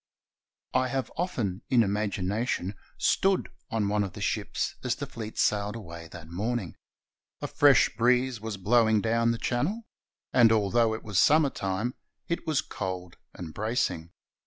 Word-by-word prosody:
I 130 0 +2
have 135 0 -2
often, 115 - -2
in 120 -3 +5
imagination, 100 0 -1 0.2
stood 195 0 +2 0.2
on 110 -3 0
one 105 0 +1
of 95 -2 -5
the - - -9
ships - - -2
as - - 0
the - - -5
fleet 110 -1 -8
sailed 105 +1 +1
away 85 -6 -8
that 80 -1 -11
morning. 100 +1 -3 0.6
A - - -4
fresh 145 -6 +4
breeze 125 0 +2
was 110 -2 -4
blowing 110 +2 +3
down 115 +2 +2
the 115 - +1
Channel, 145 - -1 0.5
and 120 -3 +6
although 110 +1 +3
it 110 - -8
was 105 -4 0
summer 150 -2 +5
time, 100 +6 -2 0.3
it 170 0 -3
was 155 -2 +2
cold 90 - -5 0.2
and 80 -3 -7
bracing. 110 -7 -1
110 Hz, 155 wpm, -28 LUFS, 100-125 Hz, 0.6 s, and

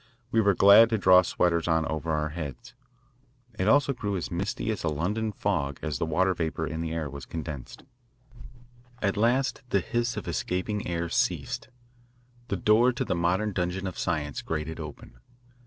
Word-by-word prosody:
We 115 - +4
were 100 -3 +3
glad 100 +5 +8
to 115 - +1
draw 95 -2 +7
sweaters 85 -1 0
on 80 -1 +2
over 80 +1 -3
our 75 0 0
heads. 80 - -7 0.9
It 95 - +1
also 140 +3 +4
grew 100 -5 -3
as 85 - -5
misty 100 +5 -2
as 105 - -4
a - - 0
London 100 +9 -1
fog 80 -10 -1
as 75 -4 -2
the 80 - -1
water 95 +4 +2
vapour 80 -1 -2
in 80 +1 -4
the 80 -1 -3
air 80 -2 -2
was 70 -2 -9
condensed. 75 -5 -7 1.2
At 100 -2 0
last 125 +6 +1
the 100 - +3
hiss 120 +5 -2
of - - -5
escaping 95 +3 -2
air 85 -1 -2
ceased. - - -1 0.8
The 100 - -2
door 110 +7 +4
to - - -2
the - - 0
modern 90 +5 0
dungeon 90 +1 -2
of 95 - -5
science 75 -6 -2
grated 80 0 -4
open. 75 -5 -9
90 Hz, 175 wpm, -27 LUFS, 80-105 Hz, 1.2 s, glad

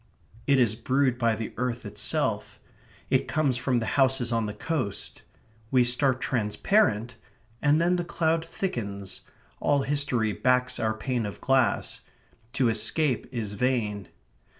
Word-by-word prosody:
It 140 -1 +4
is 120 -5 +3
brewed 130 +2 0
by 115 -2 +2
the 110 0 -5
earth 125 -1 -2
itself. 105 0 -1 0.5
It - - +2
comes 145 -5 +1
from 125 0 0
the 115 - -1 0.2
houses 130 -2 +2
on 115 -2 0
the 105 - -4
coast. 130 -5 -3 0.5
We 125 0 +4
start 130 +1 +2
transparent, 120 - +1 0.4
and 150 +1 +4
then 175 +2 +2
the 175 - -1
cloud 165 -1 0
thickens. 100 - -5 0.4
All 140 -1 +2
history 135 -6 +1
backs 125 +1 +1
our 110 -1 0
pane 120 -1 -2
of 100 - -8
glass. 135 -3 +1 0.5
To 130 - +2
escape 125 +4 +1
is 110 -5 -4
vain. 105 -4 -1
125 Hz, 140 wpm, -27 LUFS, 110-140 Hz, 0.5 s, It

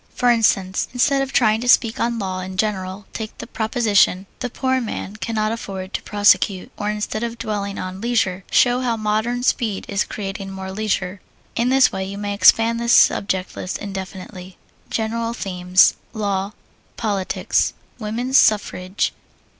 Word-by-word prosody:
For 245 -1 +3
instance, 195 -5 +2
instead 275 +2 +3
of 270 0 -3
trying 220 -4 +3
to 245 - -1
speak 230 -2 +4
on 235 0 0
"Law" 190 -3 -3
in 185 0 -6
general, 190 -1 -2
take 220 -1 -6
the - - -7
proposition, 220 -5 +2
"The 250 - -3
Poor 260 +1 0
Man 215 -2 -5
Cannot 215 -1 -1
Afford 195 -4 -6
to - - -2
Prosecute;" 205 -2 +2
or 205 - -3
instead 210 +1 -3
of 235 0 -3
dwelling 200 -3 -3
on 185 +1 -6
"Leisure," 220 -6 0
show 245 +1 +3
how 240 -3 0
modern 220 +3 -1
speed 220 -5 0
is 200 0 0
creating 195 -1 -6
more 190 0 -6
leisure. 195 -2 -2 0.3
In 235 +2 +1
this 265 0 +5
way 190 -1 -3
you 195 +1 -6
may 205 0 -3
expand 225 +3 +5
this 235 0 +2
subject 190 -5 +3
list 185 - -4
indefinitely. 190 -2 -8 0.3
GENERAL 230 +1 -2
THEMES 180 -4 +3 0.2
Law. 200 -1 -2 0.4
Politics. 200 -4 0 0.3
Woman's 240 +5 +2
Suffrage. 195 -2 +1
210 Hz, 155 wpm, -21 LUFS, 190-230 Hz, 0.4 s, this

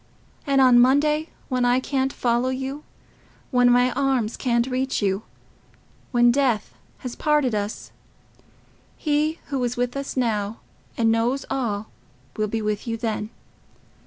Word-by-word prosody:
And 275 -1 +3
on 250 -2 +7
Monday, 300 +5 +3 0.2
when 255 -2 0
I 245 +1 +3
can't 265 0 -1
follow 240 0 0
you—when 260 -2 -3
my 245 +1 +4
arms 255 -4 0
can't 235 -2 +1
reach 260 +1 -1
you—when 225 +4 -2
death 250 -5 0 0.2
has 250 -2 -7
parted 300 -5 +1
us—He 295 +8 -5
who 270 -3 -1
is 245 0 -2
with 245 +1 -1
us 275 -1 -5
now, 220 -3 -1 0.4
and 225 -1 +3
knows 235 +4 0
all, 220 -6 -2 0.4
will 215 0 0
be 220 +1 -3
with 210 +2 -2
you 230 0 -2
then. 220 -2 -3
245 Hz, 130 wpm, -23 LUFS, 225-270 Hz, 0.4 s, on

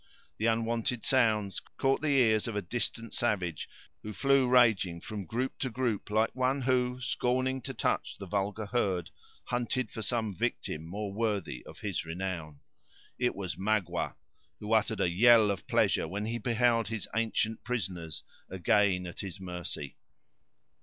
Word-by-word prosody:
The 110 - +2
unwonted 115 +1 0
sounds 110 -6 +2 0.2
caught 135 +1 +2
the 155 - -1
ears 110 -3 +4
of 115 - -3
a 105 - 0
distant 115 +3 -2
savage, 95 -9 -1 0.3
who 105 - -6
flew 135 +2 +3
raging 115 -9 +4
from 105 +1 -6
group 125 +6 -2
to 130 - -1
group, 120 -4 -1
like 110 +3 +1
one 130 +2 +1
who, 125 0 +1
scorning 130 +1 0
to - - -5
touch - - -1
the 100 - -7
vulgar 100 +3 -2
herd, 100 -6 0 0.3
hunted 125 +1 -1
for 110 - -5
some 110 -1 -1
victim 80 -2 -2
more 100 +3 -4
worthy 100 - -1
of - - -12
his 100 -5 -2
renown. 80 -3 -5 0.6
It 125 0 +1
was 95 -3 -4
Magua, 95 -4 0 0.4
who 105 +1 -2
uttered 110 -1 +2
a - - +3
yell 110 +2 +6
of 100 - -5
pleasure - - +2
when 100 +5 -3
he 115 +2 -2
beheld 115 -1 +2
his 110 -2 -4
ancient 110 -1 0
prisoners 90 -10 -3 0.3
again 95 0 +2
at 85 - -8
his 95 -3 -6
mercy. 90 -6 -5
110 Hz, 155 wpm, -30 LUFS, 95-120 Hz, 0.6 s, yell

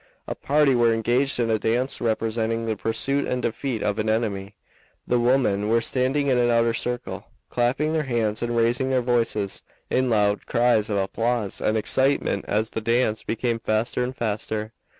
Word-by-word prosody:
A - - -2
party 145 -1 +2
were 120 -2 +3
engaged 125 +4 +1
in 115 -1 +1
a 110 - +1
dance 120 +5 -1
representing 115 0 -1
the 110 -1 -1
pursuit 125 +7 -1
and 125 - -1
defeat 120 -1 -2
of 105 +1 -1
an 110 0 0
enemy. 105 -3 -2 0.5
The 125 - +1
women 120 -5 +2
were 115 +1 +4
standing 130 +4 0
in 130 -3 +2
an 120 0 +3
outer 115 -1 +3
circle, 120 +1 -4 0.2
clapping 130 +6 0
their 160 - +1
hands 115 -4 -1
and 120 0 -1
raising 120 +3 +2
their 130 -1 +2
voices 115 -5 0 0.3
in 130 0 +2
loud 105 -2 +1
cries 120 -3 +2
of 105 - 0
applause 115 +2 -1
and 110 - +1
excitement 130 -2 +1
as 110 +1 0
the 110 - -3
dance 115 -1 +1
became 115 0 -2
faster 115 +3 0
and 125 +1 -4
faster. 110 -1 -3
115 Hz, 175 wpm, -24 LUFS, 110-125 Hz, 0.5 s, were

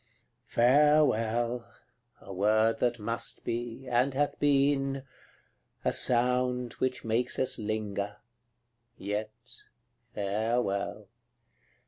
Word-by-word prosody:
CLXXXVI. - - -41
Farewell! 120 -3 +3 0.5
a 95 - -9
word 110 +4 +2
that 120 -1 +1
must 115 +1 -3
be, 120 +2 -4
and 125 +2 +1
hath 145 +1 0
been 135 -1 +2 0.8
A - - +2
sound 125 0 +1
which 130 -2 -1
makes 115 +3 0
us 130 - +1
linger; 105 -1 -3 0.8
yet, 105 +2 -3 0.9
farewell! 105 0 -1
120 Hz, 90 wpm, -29 LUFS, 110-125 Hz, 0.9 s, Farewell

